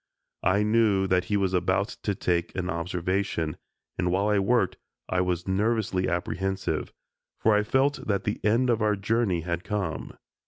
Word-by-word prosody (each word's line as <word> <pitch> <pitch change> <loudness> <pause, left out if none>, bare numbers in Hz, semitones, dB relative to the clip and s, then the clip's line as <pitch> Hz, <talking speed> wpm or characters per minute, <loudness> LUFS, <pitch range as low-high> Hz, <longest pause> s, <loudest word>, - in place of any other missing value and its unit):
I 95 +3 +3
knew 105 -3 +3
that 90 -1 +2
he 105 - +1
was 95 -2 0
about 95 +3 +1
to 100 - -1
take 85 -1 -1
an 95 0 -2
observation, 90 -1 -2 0.4
and 90 - +1
while 100 +4 +1
we 105 -1 +3
worked 115 +5 +2 0.3
I 90 - +1
was 90 -1 -1
nervously 100 -1 +1
apprehensive, 95 +2 -2 0.5
for 110 - +3
I 105 - +4
felt 135 +5 +1
that 100 -3 0
the 105 - -3
end 120 +4 +3
of 115 -2 0
our 105 -1 +3
journey 100 -3 0
had 85 +1 -3
come. 100 -8 -3
95 Hz, 165 wpm, -27 LUFS, 90-105 Hz, 0.5 s, I